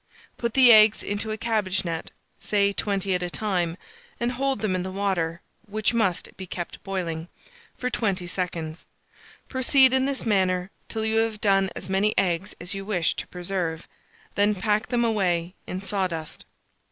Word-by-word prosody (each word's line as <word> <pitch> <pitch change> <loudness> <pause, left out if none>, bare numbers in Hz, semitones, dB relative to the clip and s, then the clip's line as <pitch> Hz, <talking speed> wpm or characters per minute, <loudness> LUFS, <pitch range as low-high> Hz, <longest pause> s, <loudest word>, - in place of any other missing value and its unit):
Put 235 -1 -3
the 255 -3 +9
eggs 215 0 +6
into 205 +2 -2
a 215 - -3
cabbage 210 -4 0
net, 165 -1 -3 0.3
say 200 -1 +1
20 195 -2 0
at 180 - 0
a 180 - -2
time, 180 -4 -1 0.4
and 240 +1 0
hold 270 +1 -1
them 215 -4 0
in 185 - 0
the 185 - -4
water 185 -4 -1 0.3
(which 215 +2 +1
must 195 -7 0
be 190 - -7
kept 175 0 -6
boiling) 170 -4 -3 0.5
for 250 0 -2
20 195 -6 -1
seconds. 170 -3 -4 0.6
Proceed 260 0 +5
in 265 0 +3
this 275 -2 -2
manner 185 -3 +1 0.2
till 220 -1 -2
you 220 0 +1
have 225 -1 +1
done 195 -2 +3
as 180 - -7
many 195 +3 +1
eggs 180 0 0
as 175 +4 -3
you 195 0 -4
wish 190 -5 +1
to - - -4
preserve; 175 -2 -3 0.5
then 205 +1 +3
pack 210 +2 0
them 240 -1 +1
away 180 -6 +1
in 185 - -4
sawdust. 185 -6 -2
195 Hz, 170 wpm, -25 LUFS, 180-220 Hz, 0.6 s, the